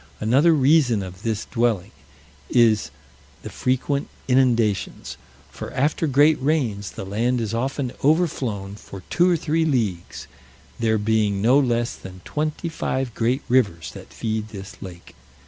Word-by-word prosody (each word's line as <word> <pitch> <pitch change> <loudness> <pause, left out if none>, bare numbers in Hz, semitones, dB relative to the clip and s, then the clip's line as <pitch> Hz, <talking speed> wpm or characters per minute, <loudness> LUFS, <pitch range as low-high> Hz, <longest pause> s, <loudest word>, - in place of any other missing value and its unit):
Another 135 +10 +4
reason 135 -7 +3
of 90 0 -9
this 110 -1 -2
dwelling, 115 -6 0 0.6
is 115 -3 +3 0.5
the - - -7
frequent 135 +2 -1 0.2
inundations; 120 -6 +1 0.4
for - - -7
after 150 +4 +1
great 145 +2 +4
rains, 120 - -1
the - - -6
land 115 +6 0
is 115 -1 -3
often 130 +2 -2
overflown 130 - 0
for 95 -2 -11
two 175 +1 +4
or 175 - +3
three 160 +1 0
leagues, 115 - -2 0.5
there 110 -1 +2
being 105 -1 +1
no 125 +7 +4
less 120 -3 0
than 95 -1 -11
twenty 155 +3 -2
five 130 -6 -2
great 120 +5 0
rivers 100 -11 +1
that - - -12
feed 110 -1 -3
this 95 -3 -9
lake. 90 -2 -10
120 Hz, 140 wpm, -23 LUFS, 105-140 Hz, 0.6 s, Another